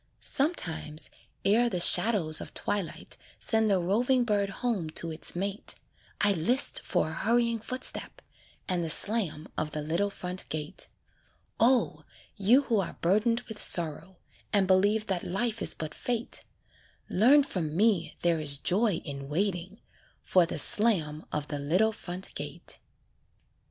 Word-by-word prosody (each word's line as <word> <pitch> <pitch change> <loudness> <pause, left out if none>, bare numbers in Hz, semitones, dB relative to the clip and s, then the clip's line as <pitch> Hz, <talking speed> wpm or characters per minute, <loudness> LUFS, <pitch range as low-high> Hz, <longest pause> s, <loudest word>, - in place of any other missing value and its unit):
Sometimes, 170 - +1 0.3
ere 230 +4 +3
the 180 - -3
shadows 175 -4 +5
of - - -10
twilight 200 -5 -3 0.2
Send 220 -1 +3
the 195 - +2
roving 240 +8 +1
bird 205 -3 -1
home 200 -5 -3
to 165 +1 -2
its 155 +2 0
mate, 195 +3 0 0.4
I 205 - +4
list 235 - +3
for 155 - -1
a - - -7
hurrying 235 +5 0
footstep, 255 +4 -1 0.5
And 180 -3 -1
the 165 - -3
slam 170 -4 +3
of 155 -1 -4
the 150 - -4
little 170 +7 -1
front 180 -1 -6
gate. 150 -1 -1 0.7
O! 245 +2 +2 0.3
you 235 +7 +3
who 230 -6 0
are 190 - -5
burdened 215 +7 +1
with 220 -3 -5
sorrow, 170 +2 +2 0.3
And 200 -3 +2
believe 205 +3 +2
that 190 -4 -3
life 220 +4 -3
is - - -1
but 155 -1 -7
fate, 240 -1 -4 0.6
Learn 265 +9 +4
from 165 - -4
me 205 -5 +1
there 170 -2 +1
is 145 -2 +2
joy 195 +4 +1
in 140 -2 -7
waiting 185 +4 -3 0.4
For 180 -3 +2
the - - -4
slam 165 -9 +3
of 150 -1 -4
the 145 -1 -4
little 180 +10 +1
front 185 -3 -6
gate. - - -6
195 Hz, 145 wpm, -27 LUFS, 165-225 Hz, 0.7 s, shadows